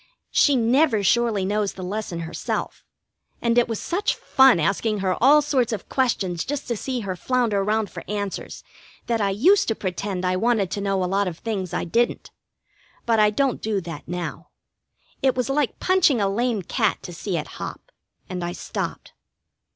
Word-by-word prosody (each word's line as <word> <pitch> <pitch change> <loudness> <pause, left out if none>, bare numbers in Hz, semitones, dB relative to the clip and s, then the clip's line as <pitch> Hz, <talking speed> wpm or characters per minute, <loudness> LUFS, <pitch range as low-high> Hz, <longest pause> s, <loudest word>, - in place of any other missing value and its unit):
She 285 - +4
never 240 -1 +3
surely 225 -2 +2
knows 205 0 0
the 185 - -8
lesson 185 -3 -4
herself, 165 +1 -4 0.6
and 235 -1 +1
it 240 -1 +4
was 225 -2 -3
such 400 +5 -1
fun 265 -8 +5
asking 200 +6 0
her 185 -1 +1
all 295 +3 +7
sorts 260 -5 +1
of 215 -4 -5
questions 195 -10 0
just 290 0 -4
to 235 - 0
see 250 +3 -3
her 190 -3 -3
flounder 225 0 0
round 215 0 0
for - - -8
answers 205 -1 -4 0.4
that 230 -2 0
I 200 - +2
used 315 - +4
to 225 - +1
pretend 185 -1 -3
I 185 0 +1
wanted 215 -3 +1
to 200 - -2
know 195 -1 0
a - - +1
lot 195 +2 +1
of 170 -3 -4
things 195 -5 -3
I - - -1
didn't. 235 +8 0 0.7
But 230 -2 +2
I 210 0 +6
don't 260 +4 0
do 215 -2 0
that 165 -3 -8
now. 175 0 -5 0.7
It 265 -2 +3
was 250 +1 0
like 285 -2 0
punching 365 -9 +3
a 200 - +2
lame 220 0 0
cat - - 0
to 175 - -7
see 175 +1 -3
it - - -3 0.2
hop, - - -7 0.4
and 180 -2 -4
I 175 0 -3
stopped. - - -5
215 Hz, 185 wpm, -23 LUFS, 190-245 Hz, 0.7 s, all